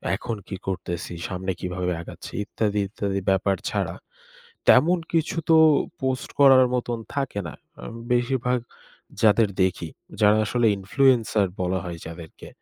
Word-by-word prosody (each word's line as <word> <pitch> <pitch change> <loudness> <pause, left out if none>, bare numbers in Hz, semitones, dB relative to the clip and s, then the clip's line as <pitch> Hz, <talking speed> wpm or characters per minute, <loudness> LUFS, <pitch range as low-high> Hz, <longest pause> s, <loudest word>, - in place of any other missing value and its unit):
এখন 115 - -4
কি 95 - -5
করতেছি, 90 -2 -4
সামনে 95 0 -3
কিভাবে 90 0 -3
আগাচ্ছি - - -10
ইত্যাদি, 105 -1 -1
ইত্যাদি 100 -2 -2
ব্যাপার 95 0 +2
ছাড়া - - -2 0.7
তেমন 175 +3 +6
কিছু 165 0 0
তো 160 - +7 0.4
post 130 -2 -2
করার 130 -2 +7
মতন 120 -1 -2 0.2
থাকে 135 -7 -2
না। - - -8 0.3
আম 60 - -8 0.2
বেশিরভাগ 125 0 +1 0.6
যাদের 110 0 +5
দেখি, 90 -3 -1 0.3
যারা 105 0 +5
আসলে 120 +3 +1
influencer 110 -1 +2 0.2
বলা 90 +1 0
হয় 85 -1 -6
যাদেরকে। 80 -1 -10
105 Hz, 135 wpm, -24 LUFS, 95-125 Hz, 0.7 s, তো